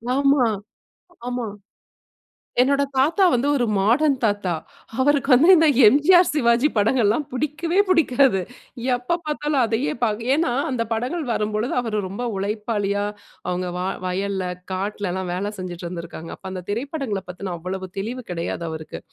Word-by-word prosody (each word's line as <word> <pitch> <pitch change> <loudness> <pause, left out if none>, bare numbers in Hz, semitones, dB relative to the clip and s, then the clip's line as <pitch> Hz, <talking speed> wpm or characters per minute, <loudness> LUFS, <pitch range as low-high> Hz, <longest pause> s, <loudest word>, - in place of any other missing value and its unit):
ஆமா. 275 -2 +4 0.8
ஆமா. 245 -1 -2 1.2
என்னோட 280 +2 +3
தாத்தா 320 +9 +3
வந்து 250 +4 +1
ஒரு 240 - +1
மாடர்ன் 260 +8 +3
தாத்தா. 205 -4 +1 0.5
அவருக்கு 285 0 +2
வந்து 285 +8 +6
இந்த 320 0 +5 0.2
எம்ஜிஆர், 320 - +6
சிவாஜி 240 -1 +3
படங்கள்லாம் 225 +4 +2
புடிக்கவே 305 +7 -1
புடிக்காது. 270 - +3 0.5
எப்ப 250 +8 -1
பார்த்தாலும் 295 -2 0
அதையே 230 +5 -1
பா 225 - +4 0.2
ஏன்னா, 305 -4 +1 0.2
அந்த 235 -2 0
படங்கள் 255 +9 -1
வரும்பொழுது 215 +2 -1
அவரு 220 -3 -1
ரொம்ப 200 +6 -5
உழைப்பாளியா 205 0 -1 0.4
அவங்க 180 0 -2
வா 180 - -2 0.2
வயல்ல, 190 +1 -2 0.3
காட்டுலல்லாம் 190 -1 -3
வேலை 200 +3 -2
செஞ்சிட்டுருந்திருக்காங்க. 175 -2 -7
அப்போ 190 - -11
அந்த 185 -1 -6
திரைப்படங்கள 245 -3 -3
பத்தின 180 0 -5
அவ்வளவு 185 +2 -5
தெளிவு 235 +5 -4
கிடையாது 170 0 -3
அவருக்கு. 160 -1 -7
230 Hz, 130 wpm, -22 LUFS, 195-280 Hz, 1.2 s, வந்து